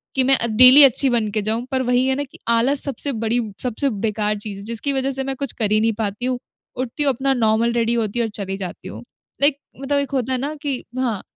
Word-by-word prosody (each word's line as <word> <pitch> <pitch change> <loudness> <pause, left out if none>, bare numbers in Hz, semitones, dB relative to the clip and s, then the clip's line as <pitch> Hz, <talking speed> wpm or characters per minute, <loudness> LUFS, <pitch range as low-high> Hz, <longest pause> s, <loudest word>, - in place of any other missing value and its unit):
कि 265 - +3
मैं 270 +1 +3 0.2
डेली 255 +4 +9
अच्छी 275 0 +5
बन 235 -3 0
के 215 +1 -1
जाऊँ। 220 +3 -1
पर 260 -1 0
वही 250 +1 +1
है 265 - +1
ना 285 - -2
कि 275 - -14
आलस 240 +5 +3
सबसे 280 +1 -2
बड़ी 230 +2 0 0.2
सबसे 255 +3 -1 0.2
बेकार 210 0 -1
चीज़ 205 -1 -6
है - - -10
जिसकी 235 +5 -3
वजह 270 0 -1
से 270 0 -3
मैं 270 0 -4
कुछ 280 +1 -2
कर 210 -2 +1
ही 215 - +3
नहीं 225 0 +1
पाती 210 +2 -3
हूँ। 255 0 -1 0.4
उठती 255 +3 -2
हूँ 285 - +3
अपना 270 +2 0
नॉर्मल 230 -1 +1
रेडी 235 0 0
होती 230 -1 -1
हूँ 235 - +1
और - - -4
चली 195 -1 -4
जाती 185 -1 -7
हूँ। - - -9 0.4
लाइक 285 0 +4 0.2
मतलब 285 +1 0
एक 280 0 -3
होता 260 -2 -2
है - - 0
ना 285 +4 -3
कि 275 -3 -3 0.2
हाँ, 235 -6 -1
245 Hz, 255 wpm, -20 LUFS, 220-270 Hz, 0.4 s, डेली